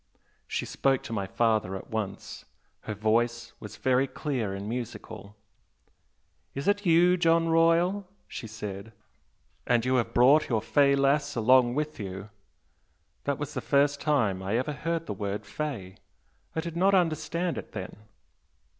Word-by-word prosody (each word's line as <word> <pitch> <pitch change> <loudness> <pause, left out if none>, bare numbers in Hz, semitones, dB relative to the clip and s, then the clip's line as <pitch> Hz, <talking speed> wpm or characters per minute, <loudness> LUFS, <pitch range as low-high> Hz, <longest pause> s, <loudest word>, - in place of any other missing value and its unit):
She - - -2
spoke 135 -1 0
to 115 - -6
my 100 -3 -2
father 110 -3 +1
at 95 - -9
once 110 -3 -5 0.4
her 105 - -4
voice 115 +2 0
was - - -9
very 130 +1 +2
clear 130 -9 -3
and 100 +1 -5
musical. 110 -3 -6 1.2
'Is 140 - -4
it 205 -1 +1
you, 175 +2 +5
John 165 -1 +3
Royal?' 170 +4 +3 0.2
she 115 - -7
said 105 0 -7 0.7
'and 120 -1 +2
you 130 0 +2
have 115 -2 0
brought 140 +6 +5
your 115 -3 +2
fey 140 -1 +4
lass 140 +1 +1
along 120 +1 +4
with 150 +1 -3
you!' 95 +1 -7 0.9
That 140 -1 0
was 145 0 -5
the - - -3
first 140 0 +2
time 115 -11 +1
I 100 +4 -1
ever 130 +5 -1
heard 165 +3 -3
the - - -4
word 100 0 -4
'fey.' 100 -6 -5 0.6
I 160 - 0
did 170 0 -6
not 195 +3 +3
understand 170 0 0
it - - -11
then." - - -6
130 Hz, 155 wpm, -28 LUFS, 110-155 Hz, 1.2 s, you